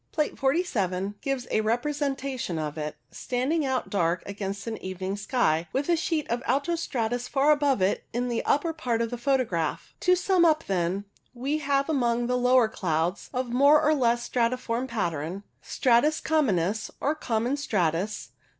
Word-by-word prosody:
Plate 305 -1 -1
47 205 - 0
gives 270 -3 -2
a 220 - +2
repre 240 +7 0
sentation 270 - -2
of 150 -1 -3
it, 150 -1 -4 0.2
standing 265 +6 -1
out 265 -2 -1
dark 170 -3 +1
against 200 0 -5
an 225 -1 -4
evening 185 +1 -4
sky, 205 - 0
with 280 +4 -1
a 345 - +5
sheet 320 -2 -1
of 235 +1 -1
alto 285 +5 +1
stratus 245 -6 -2
far 285 +1 +3
above 285 -8 +2
it 190 - +1
in 245 +1 -1
the 235 -1 -1
upper 325 +4 +1
part 240 -7 -1
of 230 - -4
the 245 - -3
photograph. 235 - -1
To 365 0 +4
sum 365 -1 +2
up, 315 -2 +4
then, 190 +1 -1 0.3
we 275 +5 -1
have 275 -1 +1
among 240 -6 +1
the 250 +1 0
lower 250 -1 +4
clouds 175 -2 -2
of 255 -2 -2
more 285 +4 +6
or 310 0 +3
less 240 -4 +1
stratiform 245 0 0
pattern 175 - -3
— - - -44
Stratus 260 +5 +2
communis, 215 - +1
or 290 - +1
Common 245 -3 -1
stratus. 200 - -1
245 Hz, 170 wpm, -27 LUFS, 200-280 Hz, 0.3 s, more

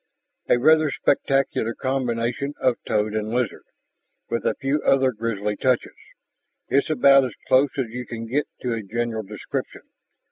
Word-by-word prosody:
"A - - +5
rather 155 +4 +4
spectacular 135 -4 0
combination 130 +1 -2
of 125 -2 +2
toad 105 0 0
and 110 0 -2
lizard, 120 +1 -2 0.7
with 115 - -1
a - - +1
few 140 +2 -1
other 135 -1 +3
grisly 105 -2 -2
touches, 130 +2 0 0.8
is 140 - +2
about 135 -2 +6
as 130 - -4
close 135 +2 +4
as 130 -4 -1
you 125 +1 -6
can 115 -1 -6
get 140 +6 -1
to 125 -2 -1
a 115 - -3
general 115 +2 -3
description. 105 0 -6
125 Hz, 150 wpm, -23 LUFS, 115-135 Hz, 0.8 s, about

